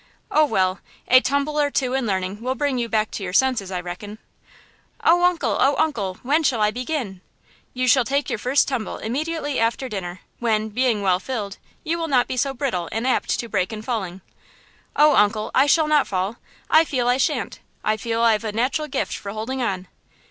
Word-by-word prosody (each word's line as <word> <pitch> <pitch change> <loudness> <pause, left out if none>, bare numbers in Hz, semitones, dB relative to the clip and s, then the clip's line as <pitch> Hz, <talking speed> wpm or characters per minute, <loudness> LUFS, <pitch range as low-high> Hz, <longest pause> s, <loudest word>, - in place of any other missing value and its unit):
"Oh, 310 - +5
well, 190 -7 +1 0.3
a 255 - +7
tumble 285 +3 0
or 290 - +2
two 260 -2 -1
in 265 -3 0
learning 190 +1 -2
will 255 +2 -1
bring 275 -1 0
you 235 -1 -2
back 215 -1 0
to 200 - -5
your 180 -1 -4
senses, 250 -5 +2
I 185 -2 -3
reckon!" 180 +4 -7 0.9
"Oh, 350 +1 +4
uncle! 355 -1 +2
oh, 275 +1 +4
uncle! 225 -13 0
When 290 +6 +2
shall 260 -6 +1
I 210 0 +3
begin?" 245 - -4 0.5
"You 255 0 0
shall 255 0 +5
take 280 +4 -1
your - - -2
first 255 +6 +2
tumble 255 -5 -3
immediately 290 +4 -2
after 230 +3 0
dinner, 185 -5 -6 0.2
when, 220 -2 0
being 230 -2 0
well 185 -2 +3
filled, 205 -4 -5 0.2
you 335 0 -1
will 330 - -2
not 255 -5 +3
be - - -3
so 275 +2 0
brittle 240 - -2
and 225 +3 -2
apt 260 - +1
to 235 - -3
break 185 -3 -1
in 215 -1 -6
falling!" 195 -6 -3 0.7
"Oh, 300 0 +5
uncle! 215 +1 +2
I 270 +2 +4
shall 310 +1 +4
not 300 -2 +3
fall! 190 +4 -2 0.3
I 315 - +6
feel 255 -6 -1
I 245 +1 +3
shan't! - - -1 0.2
I 215 - +2
feel 225 +2 -2
I've 225 -1 +3
a 220 - -2
natural 260 +8 -1
gift 275 - -2
for 200 - -6
holding 240 +5 -4
on!" 190 -6 -2
240 Hz, 205 wpm, -22 LUFS, 210-275 Hz, 0.9 s, a